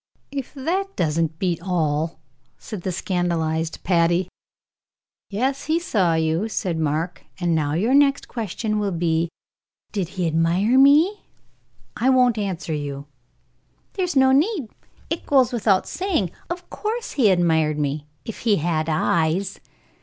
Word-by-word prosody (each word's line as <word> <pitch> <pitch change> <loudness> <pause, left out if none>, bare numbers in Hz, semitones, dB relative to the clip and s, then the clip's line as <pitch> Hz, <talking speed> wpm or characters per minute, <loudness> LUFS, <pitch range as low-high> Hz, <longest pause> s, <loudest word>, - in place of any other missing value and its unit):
"If 275 0 -5
that 375 +8 -2
doesn't 160 0 0
beat 175 -2 -1
all!" 160 -3 -1 0.4
said 210 -5 -7
the 185 - -2
scandalized 165 -3 -1
Patty. 175 0 +2 1.0
"Yes, 260 +7 -1
he 320 +2 +1
saw 190 - +1
you," 160 +6 0
said 180 -6 -2
Mark; 160 +3 -2 0.2
"and 175 -2 +1
now 150 -2 0
your 215 +11 +1
next 280 0 +4
question 215 -1 -3
will 205 -1 0
be, 165 -1 0 0.6
'Did 190 -5 -2
he 180 - 0
admire 170 +8 +2
me?' 310 +9 +5 0.7
I 255 - +1
won't 250 -4 +4
answer 185 -5 -3
you." 140 -2 -4 0.9
"There's 360 -4 -2
no 265 -1 +5
need; 300 - +2 0.4
it 330 - -3
goes 260 -4 +4
without 205 -5 +2
saying. 340 - -1 0.2
Of 350 +1 -5
course 450 +2 -3
he 240 -7 +3
admired 160 -4 +2
me 145 0 -2 0.2
if 225 - -7
he 220 -3 +2
had 160 -2 -1
eyes. 165 +4 0
185 Hz, 140 wpm, -23 LUFS, 165-260 Hz, 1.0 s, me